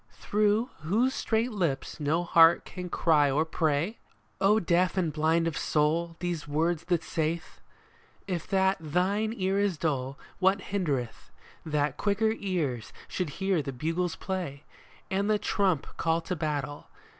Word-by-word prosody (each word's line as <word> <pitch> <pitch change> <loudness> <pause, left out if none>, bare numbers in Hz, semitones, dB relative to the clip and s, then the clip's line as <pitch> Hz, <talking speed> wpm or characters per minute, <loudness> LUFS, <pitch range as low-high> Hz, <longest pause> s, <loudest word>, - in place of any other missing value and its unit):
Through 210 +4 +1
whose 220 +12 +1
strait 230 -2 0
lips 170 -11 -2
no 155 +4 +1
heart 170 -1 +6
can 180 -1 -7
cry 150 -4 +3
or 150 +4 +2
pray? 160 +5 0 0.2
" - - -38
O 210 +3 +5
deaf 180 0 +1
and 170 -5 +1
blind 160 +2 +2
of 165 - -1
soul, 165 +3 +1
these 175 -4 -3
words 160 +2 0
that 175 -3 +1
saith! 160 +1 -3 0.6
If 175 -4 -3
that 190 0 +2
thine 185 +7 0
ear 190 0 +1
is 200 -5 +1
dull, 140 -3 -2 0.2
what 190 +1 +3
hindereth 145 -12 -2 0.3
That 150 -2 -1
quicker 220 +2 +1
ears 150 - -2 0.2
should 180 -4 -2
hear 190 -4 +1
the 140 - -4
bugles 165 +6 -2
play 180 -8 -4 0.5
And 200 +2 0
the 215 - +4
trump 190 -7 +1
call 165 0 +1
to 175 +2 -3
battle 145 -3 -3
170 Hz, 150 wpm, -28 LUFS, 155-195 Hz, 0.6 s, heart